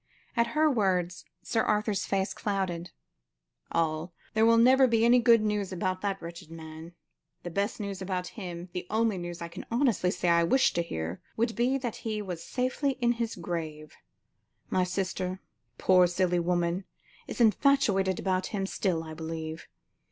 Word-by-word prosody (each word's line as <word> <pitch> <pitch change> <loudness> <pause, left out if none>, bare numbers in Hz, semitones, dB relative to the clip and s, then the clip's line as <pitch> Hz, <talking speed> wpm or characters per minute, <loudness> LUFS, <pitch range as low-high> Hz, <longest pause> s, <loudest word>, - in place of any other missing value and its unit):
At 235 -1 +3
her 310 0 +5
words, 185 - 0 0.2
Sir 225 - +1
Arthur's 210 -1 0
face 195 0 0
clouded. 185 -4 -2 0.8
"All! 160 +1 -1 0.2
there 220 +1 +4
will 230 0 +6
never 260 +3 +6
be 230 -1 +3
any 245 +1 +6
good 230 -1 +6
news 210 -2 -1
about 185 0 -2
that 195 -1 -1
wretched 170 0 -9
man. 160 +1 -9 0.5
The 175 - -5
best 200 +6 -1
news 200 -2 -4
about 180 -1 -3
him, 180 -3 -7
the 180 - -4
only 220 -3 +1
news 175 0 -6
I - - -4
can 170 - -8
honestly 235 -7 +2
say 180 -1 0
I 170 0 +5
wish 260 +10 +3
to 170 - +1
hear, 85 - -4 0.2
would 230 0 0
be 250 +3 +2
that 245 -4 -4
he 220 -2 -3
was 180 -5 -5
safely 255 +2 -1
in 245 -2 +1
his 230 -1 -2
grave. 160 -4 -5 0.8
My 185 - +3
sister, 185 0 -2 0.4
poor 185 -1 +5
silly 180 0 +1
woman, 175 +1 0 0.4
is - - -6
infatuated 215 -6 +3
about 185 -1 0
him 200 -3 -2
still, 180 -4 -1
I 160 -1 -8
believe. 160 0 -6
190 Hz, 165 wpm, -29 LUFS, 170-225 Hz, 0.8 s, will